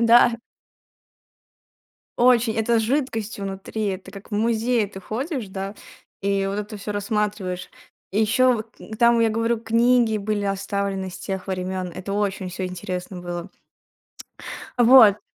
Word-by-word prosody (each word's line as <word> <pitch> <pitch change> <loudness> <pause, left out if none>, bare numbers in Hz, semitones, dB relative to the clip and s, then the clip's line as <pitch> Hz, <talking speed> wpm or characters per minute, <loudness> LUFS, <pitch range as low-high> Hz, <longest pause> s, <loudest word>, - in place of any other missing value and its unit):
Да. 235 0 +6 1.8
Очень. 240 -2 +4
Это 225 +1 +2
с - - +1
жидкостью 225 -5 -1
внутри. 195 +2 -4
Это 190 -1 -4
как 200 +2 -12
в - - -3
музее 225 +1 +1
ты 190 -1 -10
ходишь, 250 - -4
да, 195 +1 -5 0.5
и 195 0 0
вот 195 +1 -2
это 210 +1 -5
всё 205 +1 -5
рассматриваешь. 205 -3 -2 0.4
И 205 - +2
еще 250 +4 +4
вот 220 -1 -5
н 220 - -8
там, 235 +1 +5
я 230 - +4
говорю, 230 +1 0
книги 230 -1 +3
были 205 0 -1
оставлены 195 -1 -2
с - - -9
тех 190 -1 -5
времён. 185 -1 -3
Это 190 +2 -5
очень 200 -2 -1
всё 185 +1 -4
интересно 180 0 -5
было. 175 +1 -5 1.3
Вот. 235 -4 +8
210 Hz, 145 wpm, -23 LUFS, 195-230 Hz, 1.8 s, Вот